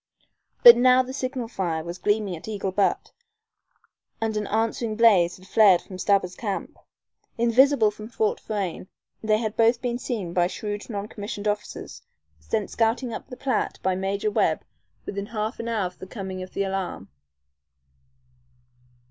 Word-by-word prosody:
But 240 0 +11
now 255 +1 +5
the 255 +1 -8
signal 255 -3 -3
fire 170 -8 -2
was 170 +2 -7
gleaming 205 -2 0
at 160 - -11
Eagle 200 -3 -3
Butte, 200 +1 0 1.1
and 225 -1 -1
an 210 -1 -2
answering 225 +1 -1
blaze 200 -7 +4
had 185 - -17
flared 200 -3 +5
from 185 -1 -10
Stabber's 190 -2 +2
camp. 200 -2 -4 0.6
Invisible 235 0 +4
from 215 +1 -10
Fort 220 -2 -1
Frayne, 195 -4 -4 0.3
they 215 -1 +2
had 220 -1 -3
both 230 +1 +3
been 245 -1 -2
seen 210 -10 -4
by 175 0 +3
shrewd 205 +3 -5
non 205 -2 -4
commissioned 205 0 -6
officers, 210 0 -4 0.4
sent 75 - -3
scouting 230 +2 0
up - - -7
the 250 - -9
Platte 260 -5 -1
by 190 - +2
Major 195 +3 -1
Webb - - +1 0.4
within 200 0 -4
half 220 +1 -3
an 230 - -4
hour 220 -4 0
of 180 0 -7
the 190 - -9
coming 190 -2 -6
of 185 - -9
the 200 - +1
alarm. 190 - -4
210 Hz, 160 wpm, -25 LUFS, 190-230 Hz, 1.1 s, But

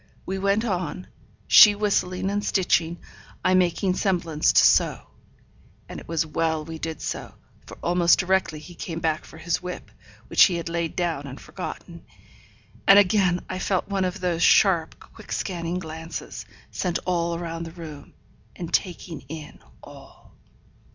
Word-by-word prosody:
We 190 +1 -3
went 200 +3 +1
on; 180 -4 -3 0.4
she 210 -2 +8
whistling 195 -2 0
and 205 0 -1
stitching, 175 -3 +1 0.5
I 185 - +4
making 185 +1 +2
semblance 170 -5 +1
to - - +5
sew. - - +3 0.8
And - - -8
it - - -14
was 165 -1 0
well 160 0 -1
we 160 0 -7
did 160 -1 -5
so; - - -5 0.3
for - - -11
almost 175 0 +4
directly 185 -4 0
he 155 +4 -11
came 165 -1 -6
back 160 -1 -1
for - - -13
his 170 +1 -2
whip, 180 0 -7 0.3
which - - +6
he 180 - 0
had 170 0 -4
laid 170 -1 -2
down 165 -6 -2
and 135 - -9
forgotten; - - -8 0.8
and 195 - +9
again 185 -3 +3
I 185 - -4
felt 190 0 -1
one 195 -1 0
of 180 -1 -2
those 175 -2 -1
sharp, 170 -3 +4
quick - - -13
scanning 175 -2 -3
glances, 160 -1 -7 0.2
sent 180 -3 -1
all 170 -2 0
round 165 -1 -5
the - - -9
room, 160 -4 -11 0.4
and 170 -1 -7
taking 175 -4 -2
in 155 -1 -9 0.2
all. - - -15
175 Hz, 160 wpm, -24 LUFS, 165-185 Hz, 0.8 s, and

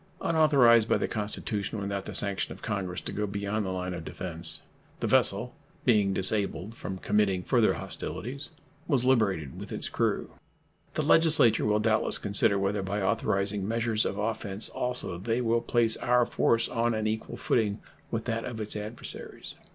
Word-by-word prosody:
Unauthorized 135 -8 +4
by - - +3
the - - -1
Constitution, 105 0 -2
without 100 0 -4
the - - -7
sanction 100 -1 -1
of - - -11
Congress, 95 -4 -3
to - - -6
go 105 0 -2
beyond 100 +1 -2
the 95 - -3
line 90 0 -3
of 85 -2 -6
defense, 85 0 +1 0.4
the - - -2
vessel, - - +3 0.3
being 105 -4 +3
disabled 100 +1 +1
from 95 -4 -6
committing 95 -2 +1
further - - +3
hostilities, 135 +5 -6 0.4
was 135 -6 +2
liberated 100 - +1
with - - -9
its - - -2
crew. - - -1 0.6
The - - 0
Legislature 160 -9 +4
will 105 0 +2
doubtless 110 0 +1
consider 100 0 +2
whether, 100 +1 -1
by 95 +2 -3
authorizing 100 0 0
measures 115 -1 0
of 100 - -3
offense 105 -1 -1
also, 125 -8 -1
they 115 +5 -1
will 115 -1 +1
place 115 -2 +3
our 125 0 +2
force 115 0 +1
on 115 -1 0
an 110 0 -2
equal 110 +1 -3
footing 105 -3 0 0.3
with 115 -1 -3
that 115 -1 -2
of 120 -3 -6
its 105 -1 -2
adversaries. 105 +2 -7
105 Hz, 165 wpm, -28 LUFS, 100-115 Hz, 0.6 s, Unauthorized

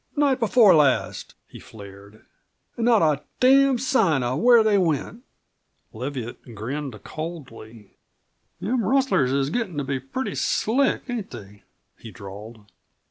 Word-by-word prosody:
"Night 285 -3 +1
before 225 -3 +5
last," 145 -5 +1
he - - -13
flared. 100 0 -14 0.5
"An' 230 - -2
not 230 -6 +4
a 150 -3 +1 0.2
damned 265 -1 +4
sign 195 - +2
of 120 +2 -2
where 240 -1 +5
they 215 -1 +2
went!" 170 - -2 0.7
Leviatt 120 -1 -7
grinned 125 +1 -6
coldly. 130 - -9 0.7
"Them 240 +1 -1
rustlers 205 - +1
is 140 +1 0
gettin' 195 -7 -3
to 145 - -1
be 135 0 -3
pretty 135 - -5
slick, 260 +5 0
ain't 240 -6 -5
they?" 105 -4 -12 0.4
he 115 - -11
drawled. 105 +1 -11
150 Hz, 135 wpm, -23 LUFS, -, 0.7 s, before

